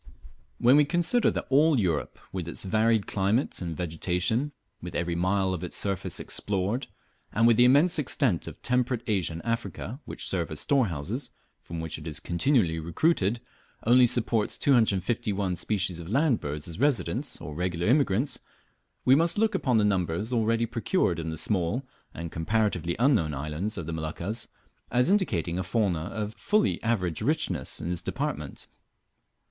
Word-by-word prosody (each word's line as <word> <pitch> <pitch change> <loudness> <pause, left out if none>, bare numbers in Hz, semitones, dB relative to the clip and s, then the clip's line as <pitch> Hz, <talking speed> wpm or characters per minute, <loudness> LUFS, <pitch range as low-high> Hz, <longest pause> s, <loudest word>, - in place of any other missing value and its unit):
When 125 +4 +5
we 150 - +6
consider 175 +9 +2
that - - -3
all 145 0 +5
Europe, 85 -7 -1
with 90 -3 -4
its 85 - -4
varied 110 +2 +2
climate 100 +7 0
and 85 -3 -4
vegetation, 90 - -1 0.3
with - - -7
every 85 0 -1
mile 95 +2 +1
of 90 - -4
its 90 - -4
surface 100 -3 -2
explored, 100 +6 -1 0.4
and 115 +3 +2
with 115 -1 +6
the 120 +2 +6
immense 150 +7 +5
extent 125 - 0
of - - -8
temperate 125 -1 +1
Asia 95 -6 0
and 85 - -8
Africa, 115 - -3
which - - -5
serve 85 -3 -1
as 80 - -3
storehouses, 90 - 0 0.3
from 85 - -7
which 80 -1 -4
it 75 - -9
is 80 -1 -3
continually 85 - +1
recruited, 100 - +1 0.4
only 125 +2 +6
supports 115 -3 0
251 105 -5 +1
species 90 -2 -1
of 85 0 -8
land 135 +2 +2
birds 75 +3 -5
as 85 +2 -7
residents 135 -9 0
or 75 - -7
regular 90 +1 -2
immigrants, 125 0 +2 0.7
we 130 - +6
must 165 +6 +3
look 220 +1 +2
upon 130 -11 +1
the 105 - +3
numbers 95 +3 0
already 115 0 +2
procured 115 - 0
in 80 0 -3
the 80 - -4
small 95 - 0 0.3
and 85 0 -7
comparatively 85 -1 0
unknown 110 - +2
islands 75 +10 -3
of 85 - -4
the 80 - -4
Moluccas 85 +7 -4 0.4
as 125 +8 +3
indicating 90 - +1
a - - -1
fauna 90 -5 0
of 105 +3 -4
fully 210 - +1
average 95 -8 -1
richness 105 - 0
in 85 - -4
this 90 -2 -1
department. - - -4
100 Hz, 165 wpm, -27 LUFS, 85-125 Hz, 0.7 s, we